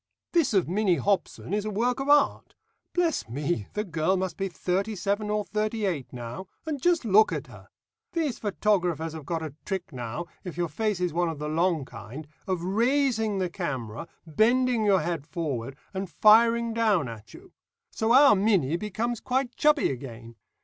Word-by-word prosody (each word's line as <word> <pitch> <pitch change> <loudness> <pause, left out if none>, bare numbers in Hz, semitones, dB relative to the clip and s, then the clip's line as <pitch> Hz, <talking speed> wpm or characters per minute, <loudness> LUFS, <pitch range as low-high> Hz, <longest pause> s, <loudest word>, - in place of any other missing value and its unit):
"This 295 -10 +2
of 190 - +3
Minnie 190 +1 +2
Hobson 195 +3 -1
is 210 0 0
a 215 - -3
work 235 +5 0
of 270 +1 -3
art. 290 -1 +3 0.4
Bless 340 - 0
me, 140 - -2
the 210 - -1
girl 170 0 0
must 185 -3 -2
be 195 - -2
thirty 190 +4 -2
seven 205 +2 -1
or 210 0 0
thirty 215 +1 -1
eight 160 -9 -2
now, 120 +8 -7 0.2
and 300 -4 -3
just 345 -4 +2
look 215 +1 +5
at - - -3
her! - - -14 0.5
These 315 -8 -1
photographers 180 -6 0
have 155 -3 -9
got 165 -2 -2
a 155 -3 -6
trick 190 -6 -4
now, 125 +6 -5 0.2
if 180 -3 -7
your 175 -1 -1
face 210 +4 -1
is 180 -3 -1
one 175 0 +1
of 160 - -5
the 150 +1 -4
long 165 -1 +1
kind, 125 +5 -9 0.2
of 185 -3 -1
raising 225 +1 +1
the 185 -1 0
camera, 130 - -4 0.2
bending 230 - +2
your 195 -3 +4
head 160 -2 -3
forward, 135 -6 -3 0.2
and 190 -1 -4
firing 230 +6 +5
down 215 - +2
at 110 -2 -10
you. - - -15 0.4
So 220 +1 0
our 275 +3 +8
Minnie 190 -7 +2
becomes 215 +4 -3
quite 255 -1 -1
chubby 300 - +3
again. 120 -3 -8
190 Hz, 180 wpm, -27 LUFS, 160-225 Hz, 0.5 s, our